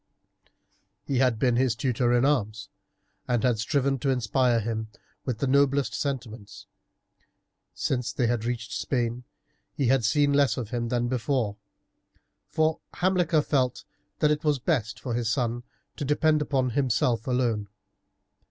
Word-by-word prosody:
He 135 -3 -1
had 125 -4 +3
been 125 0 +2
his 125 -3 +2
tutor 120 0 0
in 120 +1 +3
arms, 110 -8 0 0.6
and 120 -3 0
had 120 -4 +2
striven 135 +3 0
to 135 - -1
inspire 125 -1 +2
him 110 0 -3 0.4
with 125 -4 -2
the 140 - -1
noblest 140 +1 +2
sentiments. 115 -7 -5 1.1
Since 125 -2 -1
they 125 - 0
had 115 -1 0
reached 120 -1 -3
Spain 120 -1 -2 0.5
he 135 -4 +1
had 135 -2 +3
seen 145 +5 +3
less 140 -1 +3
of 120 -5 -4
him 120 -1 -2
than 120 0 0
before, 125 -3 -1 0.9
for 155 0 +1 0.2
Hamilcar 175 -4 +2
felt 130 -5 0 0.3
that 150 - +3
it 150 +2 -1
was 150 -2 +2
best 125 -5 -1
for 125 - -4
his 115 -2 -1
son 120 0 -1 0.4
to - - -3
depend 150 +2 +2
upon 130 -4 0
himself 120 -2 +1
alone. 120 -5 0
125 Hz, 145 wpm, -26 LUFS, 115-140 Hz, 1.1 s, had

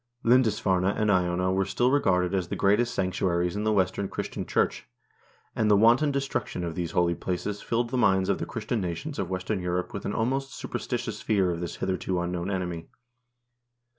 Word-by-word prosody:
Lindisf 115 -3 +3
arne 95 -2 +2
and 105 +2 +2
Iona 90 0 +1
were 95 +1 +2
still 120 +6 +1
regarded 90 -10 +2
as 95 -3 0
the - - -3
greatest 105 +5 +2
sanctuaries 90 -1 0
in 105 +1 -2
the 110 - +3
western 100 0 +1
Christian - - -5
Church, - - 0 0.7
and 110 -1 +1
the 105 - +6
wanton 120 +8 +5
destruction 135 -9 -2
of 85 -1 -3
these 85 -1 -4
holy 85 -1 +3
places 95 +4 -3
filled 120 0 -1
the 130 - 0
minds 95 -4 +3
of - - +1
the - - -4
Christian 115 -4 -3
nations 95 - -4
of 95 -3 -2
western 95 +2 -2
Europe 90 +1 -2
with 100 - -5
an 100 - -2
almost 135 +3 -1
superstitious - - -4
fear 95 -4 +2
of 85 - -3
this 85 -1 -4
hitherto 95 -1 -2
unknown 90 +1 -2
enemy. 90 -4 -3
95 Hz, 190 wpm, -27 LUFS, 90-110 Hz, 0.7 s, the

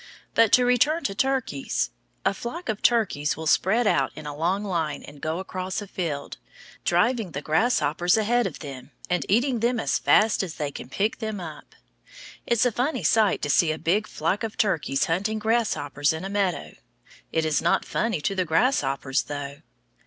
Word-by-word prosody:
But 230 -2 +4
to 250 - +6
return 290 +7 +3
to 195 - -1
turkeys. 255 - -1 0.3
A - - +3
flock 240 - -6
of 215 -1 -2
turkeys 205 -11 +2
will 160 - -6
spread 195 +9 +3
out 135 -9 +2
in - - -9
a 145 -1 -5
long 180 +6 0
line, 170 -6 -2
and 145 -1 -12
go 160 +1 -2
across 185 +1 -4
a 205 - -6
field, 160 -7 -4 0.5
driving 210 +1 +1
the 140 - -3
grasshoppers 175 - +2
ahead 235 +2 +2
of - - -7
them, 135 -3 -8 0.2
and 180 - 0
eating 240 +4 +2
them 240 +1 +1
as - - 0
fast 215 +1 +4
as 180 -5 -5
they 145 -2 -3
can 130 - -9
pick 205 +10 -1
them 220 -2 -4
up. 160 -4 -9 0.7
It - - +3
is 235 +1 +3
a 245 - +3
funny 255 +8 -1
sight 220 -3 +3
to 145 - -1
see 160 +1 +4
a 155 - -3
big 190 +7 0
flock 170 +6 -1
of 220 -1 -4
turkeys 155 -9 +1
hunting 195 +5 -1
grasshoppers 210 -11 0
in 160 +4 -5
a - - -4
meadow. 195 -3 -1 0.6
It 160 -1 0
is 155 -2 +1
not - - +2
funny 220 -8 -1
to 170 - 0
the 185 -1 0
grasshoppers, 150 - +1
though. 145 -1 -6
190 Hz, 190 wpm, -25 LUFS, 155-225 Hz, 0.7 s, to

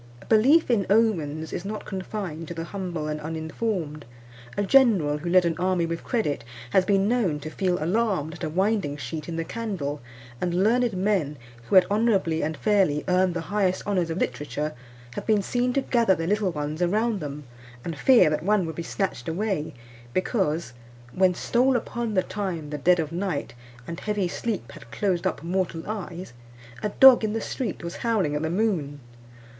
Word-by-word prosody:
A - - -16
belief 255 +8 +4
in 205 -5 +2
omens 165 -8 +1
is 175 - -3
not 210 +2 -5
confined 185 -4 -5
to 170 - -6
the 165 - -4
humble 175 -4 -4
and 150 0 -3
uninformed. 160 0 -3 0.5
A 205 - +1
general 195 - +4
who 170 +3 -4
led 180 0 +5
an 165 -1 +1
army 180 -1 +1
with 165 0 -4
credit 220 - -1 0.3
has 185 +5 +4
been 195 0 +2
known 210 -11 +1
to 155 +2 -6
feel 180 +1 0
alarmed 180 -3 0
at 175 - -9
a 160 - -1
winding 190 -3 0
sheet 150 +4 -6
in 165 - -4
the 165 - -1
candle; 170 -9 -4 0.4
and 175 -1 0
learned 240 +1 +2
men, 185 -6 0 0.3
who - - +1
had 185 -1 +8
honourably 200 -7 +2
and 155 +1 -2
fairly 190 -9 +2
earned 180 -1 +2
the 170 - -1
highest 190 -3 +1
honours 185 -5 0
of 165 - -3
literature, 150 +1 -2 0.4
have - - -6
been 210 -3 +3
seen 245 +4 0
to 275 - +2
gather 230 -6 +3
their 165 - -3
little 205 +1 +1
ones 150 +1 -4
around 210 +4 +1
them, 150 -1 -6 0.4
and 165 - -3
fear 240 - +5
that 150 0 0
one 200 +1 +2
would 160 - -4
be 170 - -4
snatched 165 - -3
away, 185 -2 -2 0.4
because, 170 - 0 0.4
"When 185 +1 +3
stole 255 +6 +2
upon 235 -2 -2
the 185 - +3
time 180 -8 -4
the 150 - -4
dead 180 +4 +4
of 155 -1 -2
night, 175 -4 -3 0.3
And 170 0 -6
heavy 210 -3 -1
sleep 190 - -4
had - - -13
closed 185 - 0
up - - -3
mortal 175 -1 -1
eyes," 185 - -6 0.5
a 210 - -1
dog 260 +2 +7
in 215 -1 0
the 225 - -1
street 250 -8 -4
was 170 0 -5
howling 210 -11 0
at 150 - -1
the 160 - -1
moon. 170 -7 -1
185 Hz, 190 wpm, -25 LUFS, 160-210 Hz, 0.5 s, had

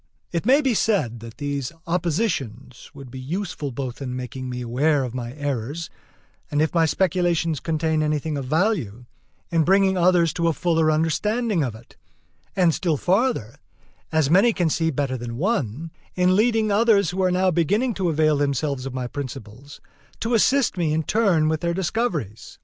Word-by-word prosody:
It 170 +4 -2
may 275 +4 +5
be 265 -4 +1
said, 190 - 0
that 115 0 -11
these 140 -2 -3
oppositions 155 - -2
would 135 -3 -11
be 130 - -8
useful 165 +1 -4
both 130 +1 -5
in 125 -2 -4
making 130 0 -6
me 125 0 -5
aware 135 +5 +1
of 125 -2 -5
my 120 -1 -5
errors, 145 +2 -4 0.6
and, 145 - -1
if 155 0 +1
my 165 -2 +3
speculations 175 -3 +1
contain 160 -1 0
anything 150 0 -1
of 140 -2 -4
value, 150 - -1 0.5
in 165 -1 +3
bringing 190 +2 +3
others 175 -2 +3
to 170 -1 0
a 165 - +2
fuller 165 -1 +1
understanding 180 +6 +1
of 120 -5 -3
it; 115 +2 -17 0.6
and 180 -4 +3
still 165 -3 0
farther, 185 - 0 0.5
as 160 -3 +2
many 195 +9 +4
can 170 -5 0
see 165 +1 +1
better 135 -3 -2
than 120 -1 -6
one, 165 - -2 0.2
in 180 0 +3
leading 220 0 +2
others 205 -3 +3
who 190 +2 -2
are 185 - +3
now 185 +1 +2
beginning 205 - +1
to 190 -4 -1
avail 155 -1 +2
themselves 140 -1 -1
of 130 - -7
my 130 -1 -3
principles, 130 0 -8 0.4
to 230 +2 -2
assist 250 0 +3
me 160 -3 +1
in 160 +1 0
turn 185 -6 +2
with 155 0 0
their 170 0 -1
discoveries. 165 - -3
160 Hz, 175 wpm, -23 LUFS, 135-185 Hz, 0.6 s, may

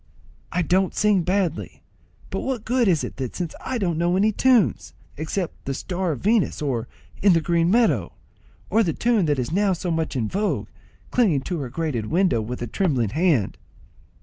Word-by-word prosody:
"I 180 +1 0
don't 185 +2 +1
sing; 210 -3 +3
badly; 180 -2 -2 0.5
but - - -2
what 255 -5 -3
good 245 -1 +2
is 170 -5 +3
that 130 -3 -5
since 175 -3 -3
I 260 - -2
don't 175 -7 -1
know 175 +2 +2
any 210 +3 +3
tunes, 245 0 +2 0.2
except 160 +4 -4
the 135 - -2
'Star 180 +2 -2
of 135 - -8
Venus,' 215 0 +2
or, 125 -6 -2 0.3
'In 200 -2 +6
the 165 - +4
green 170 +1 +1
meadow,' 230 +3 +2 0.6
or 225 - +4
the 170 -7 +1
tune 225 -7 +1
that 145 -1 +1
is 125 +2 -2
now 195 +2 +2
so 180 0 -3
much 160 -2 -1
in 115 -4 0
vogue, 205 - -1 0.4
'Clinging 190 - +3
to 170 +4 -4
her 135 -4 -4
grated 130 -6 -2
window, 175 - +2
with 120 +3 -5
a - - -1
trembling 130 - 0
hand?'" 150 - +1
175 Hz, 185 wpm, -23 LUFS, 145-200 Hz, 0.6 s, In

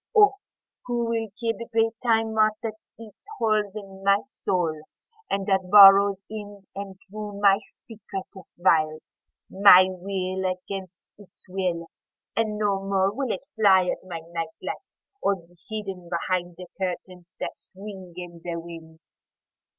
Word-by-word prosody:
(O 415 -1 +7 0.5
who 240 -1 0
will 225 -1 -1
kill 230 -2 0
the 230 - -7
great 225 0 +2
Time 225 -2 +2
Moth 215 -1 +3
that 225 -1 -2 0.3
eats 225 - -13
holes 215 -2 +1
in 195 -2 -9
my 200 +1 +4
soul 170 - -1 0.5
and 195 0 -1
that 190 -2 +1
burrows 200 -1 +8
in 205 -2 -8
and 195 -1 -7
through 205 0 -7
my 200 -1 +5 0.3
secretest 195 -4 -9
veils!)My 180 +3 +4
will 185 0 -3
against 185 0 -7 0.2
its 205 - -18
will, 180 -3 -2 0.5
and 215 -1 0
no 200 -2 0
more 195 0 +1
will 265 0 -2
it - - -4
fly 190 -4 +5
at - - -6
my 170 -3 -6
night 165 -1 -4
light - - -3 0.4
or 200 - +2
be 175 -1 -18
hidden 195 -5 -6
behind 175 0 -2
the 180 - -8
curtains 180 -1 -5
that - - -4
swing 190 -2 -10
in 175 -2 -9
the 175 -1 -4
winds. 165 -1 -12
195 Hz, 145 wpm, -25 LUFS, 180-210 Hz, 0.5 s, burrows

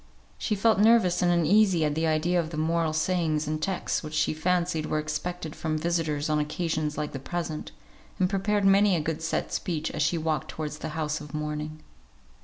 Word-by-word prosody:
She 215 - 0
felt 220 +1 +3
nervous 210 -5 +4
and 175 -1 +3
uneasy 175 0 +4
at 150 - 0
the 160 +2 0
idea 165 +3 +2
of 160 -2 -2
the 160 - -6
moral 165 +1 +1
sayings 160 -2 0
and 155 0 -2
texts 190 0 -1
which 155 -1 -7
she - - +2
fancied 170 0 0
were - - 0
expected 155 +1 -4
from 155 -1 -2
visitors 160 -3 -1
on 155 -1 +1
occasions 155 0 -2
like 150 -1 -2
the 135 - -5
present; 160 +1 -4 0.5
and 185 -2 +3
prepared 200 +2 0
many 195 0 +5
a - - +1
good 155 +1 -3
set 165 - -2
speech 160 -3 -2
as - - -3
she 155 +3 +2
walked 155 -3 -1
towards 150 -1 -5
the 160 - -4
house 155 -1 -1
of 150 0 -8
mourning. 150 0 -4
160 Hz, 200 wpm, -27 LUFS, 155-180 Hz, 0.5 s, many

